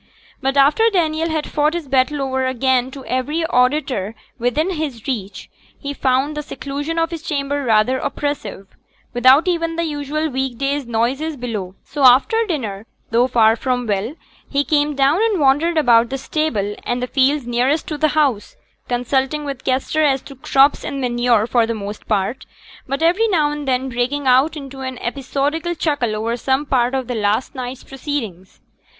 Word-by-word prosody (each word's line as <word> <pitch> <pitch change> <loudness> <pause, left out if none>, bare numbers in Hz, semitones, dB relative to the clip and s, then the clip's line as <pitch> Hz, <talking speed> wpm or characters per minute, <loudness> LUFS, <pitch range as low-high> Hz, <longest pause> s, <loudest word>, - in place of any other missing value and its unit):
But 270 +1 0
after 300 +12 +5
Daniel 325 -3 0
had 315 -1 -1
fought 300 +2 0
his 340 -4 -4
battle 275 +2 +1
o'er 265 -1 -1
again 260 0 +1
to 265 0 -10
every 295 +6 -1
auditor 250 -6 +1 0.2
within 270 +10 0
his 300 - -4
reach, 205 -7 -4 0.3
he 285 0 -5
found 270 +2 0
the 300 - -2
seclusion 290 +2 -5
of 330 +1 +1
his 330 -2 -5
chamber 285 -2 -2
rather 235 +2 +2
oppressive, 280 -9 -4 0.5
without 260 +7 +5
even 335 -2 0
the 335 - -1
usual 305 0 -2
week 265 -3 -3
days' 275 0 -1
noises 265 +7 -1
below; 210 -7 -5
so 285 -1 -4
after 270 - +5
dinner, 225 - -4 0.2
though 240 +2 +3
far 225 -3 +4
from 250 0 -1
well, 210 +6 -2 0.3
he 280 0 +1
came 295 -1 +1
down 275 +5 +3
and 440 -5 +1
wandered 295 +4 +3
about 235 -5 +4
the 270 - -3
stable 255 -8 -1
and 245 +1 -2
the - - +1
fields 270 +1 +1
nearest 250 +6 0
to 305 - -3
the 310 +1 +2
house, 270 -9 +1 0.3
consulting 265 +4 -1
with 275 -3 -5
Kester 270 +4 0
as 270 -3 +2
to 275 - -11
crops 270 +2 +3
and 280 - -4
manure 240 -3 +2
for 235 -1 +2
the 230 - -2
most 205 0 -7
part; 210 +4 -1 0.4
but 275 +4 -2
every 365 +7 +3
now 310 -8 +2
and 295 -1 -5
then 260 0 0
breaking 255 +4 -1
out 265 +5 +3
into 275 -2 -9
an 260 -1 -5
episodical 285 +7 -2
chuckle 290 -9 -1
over 225 +2 -1
some 265 +4 0
part 250 -1 +1
of 260 -2 -2
last 220 +1 -1
night's 255 -1 -6
proceedings. 245 - -6
270 Hz, 175 wpm, -19 LUFS, 245-300 Hz, 0.5 s, after